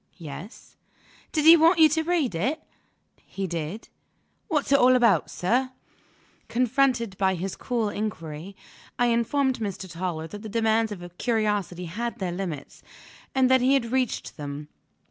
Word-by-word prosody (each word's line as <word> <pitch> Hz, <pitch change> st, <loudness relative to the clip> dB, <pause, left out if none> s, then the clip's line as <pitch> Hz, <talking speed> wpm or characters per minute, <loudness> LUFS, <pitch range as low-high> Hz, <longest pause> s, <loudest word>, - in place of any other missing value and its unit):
"Yes." 170 Hz, -, -10 dB, 0.5 s
"Did 305 Hz, -2 st, 0 dB
he 330 Hz, +1 st, +11 dB
want 330 Hz, +2 st, +5 dB
you 320 Hz, -1 st, +8 dB
to 320 Hz, +2 st, +1 dB
read 320 Hz, -, 0 dB
it?" 260 Hz, -, -1 dB, 0.6 s
"He 195 Hz, -, -5 dB
did." 170 Hz, +4 st, -5 dB, 0.6 s
"What's 300 Hz, -6 st, -1 dB
it 280 Hz, -, +6 dB
all 255 Hz, +1 st, +6 dB
about, 235 Hz, -4 st, +3 dB
sir?" 255 Hz, +8 st, 0 dB, 0.7 s
Confronted 245 Hz, -3 st, +1 dB
by 190 Hz, -1 st, +2 dB
this 185 Hz, +2 st, -4 dB
cool 235 Hz, -4 st, -1 dB
inquiry, 185 Hz, -4 st, -5 dB, 0.4 s
I 245 Hz, -, +3 dB
informed 255 Hz, +3 st, +1 dB
Mr. 200 Hz, -3 st, -4 dB
Toller 165 Hz, -1 st, -4 dB
that 205 Hz, +5 st, -9 dB
the 220 Hz, -, -7 dB
demands 225 Hz, 0 st, +1 dB
of 175 Hz, -3 st, -8 dB
curiosity 210 Hz, -6 st, -1 dB
had 230 Hz, +8 st, -4 dB
their 185 Hz, -3 st, -3 dB
limits, 175 Hz, -6 st, -6 dB, 0.5 s
and 260 Hz, -1 st, +4 dB
that 260 Hz, -1 st, +5 dB
he 260 Hz, +2 st, +4 dB
had 235 Hz, -4 st, -1 dB
reached 260 Hz, -2 st, -1 dB
them. 145 Hz, 0 st, -6 dB
220 Hz, 150 wpm, -25 LUFS, 180-255 Hz, 0.7 s, he